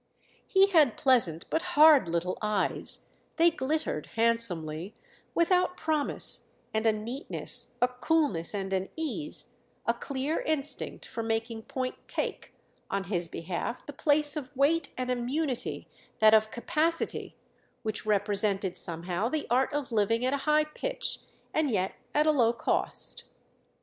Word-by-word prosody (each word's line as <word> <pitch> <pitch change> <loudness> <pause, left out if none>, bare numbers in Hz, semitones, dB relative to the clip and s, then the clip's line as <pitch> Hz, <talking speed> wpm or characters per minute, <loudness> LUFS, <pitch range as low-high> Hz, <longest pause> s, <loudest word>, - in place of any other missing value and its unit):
He 385 0 +5
had 300 - +4
pleasant 225 - +2
but 320 - +1 0.2
hard 300 - +7
little 170 +2 -1
eyes—they 215 - -1
glittered, 295 - -2
handsomely, 200 -7 +2 0.4
without 360 +1 +2
promise—and 285 -7 -2
a - - +6
neatness, 230 +6 -1
a - - +5
coolness 250 - 0
and 195 -1 -3
an 190 0 -1
ease, 315 -1 -4 0.4
a - - +2
clear 280 +3 -3
instinct 300 -2 +4
for 230 - -5
making 225 0 -2
point 255 -1 -4
take, - - -3 0.4
on 195 0 -1
his 175 -1 0
behalf, 175 +9 -5
the 290 - -8
place 295 +1 +4
of 290 -2 -7
weight 310 +5 +2
and 255 0 -2
immunity 255 +2 -2 0.3
that 215 0 +6
of 215 0 +4
capacity, 325 +8 -1 0.5
which 215 -1 -3
represented 205 -2 +1
somehow 175 +5 -2
the 305 +2 -2
art 260 +4 +2
of 290 -3 -3
living 230 +2 +1
at 260 - +1
a - - +1
high 305 0 +4
pitch - - -3 0.3
and 310 -2 +1
yet 190 -5 0 0.2
at 300 +1 +3
a 310 - +5
low 240 -6 +3
cost. - - -1
250 Hz, 135 wpm, -28 LUFS, 210-300 Hz, 0.5 s, hard